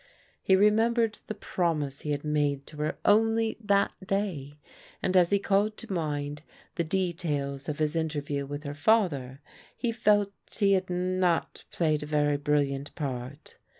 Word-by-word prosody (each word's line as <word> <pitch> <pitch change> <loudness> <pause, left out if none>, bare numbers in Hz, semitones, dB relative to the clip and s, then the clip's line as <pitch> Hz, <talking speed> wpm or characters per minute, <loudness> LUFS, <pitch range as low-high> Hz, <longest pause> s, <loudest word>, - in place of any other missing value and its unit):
He 190 - +4
remembered 220 +2 +3
the 215 - -4
promise 150 -8 -2
he 150 - -5
had 145 0 -1
made 145 -2 0
to 150 - -12
her 150 +1 -2
only 225 +1 +3
that 200 -1 +2
day, 185 -8 -2 0.4
and 185 - -1
as 175 -2 +5
he 200 - +4
called 205 +2 +1
to 230 -4 -6
mind 150 -3 -2 0.3
the 170 - -1
details 155 -6 -2
of 150 - -3
his 155 0 0
interview 145 -3 -2
with 145 +1 -6
her 145 -1 -5
father, 145 - +1 0.4
he 240 - 0
felt 205 -3 +2 0.3
he 200 -2 +3
had 185 -1 +2
not 180 -1 0
played 155 -3 0
a 150 - -6
very 145 -1 +2
brilliant 145 -1 0
part. 135 -1 -6
160 Hz, 155 wpm, -28 LUFS, 145-200 Hz, 0.4 s, as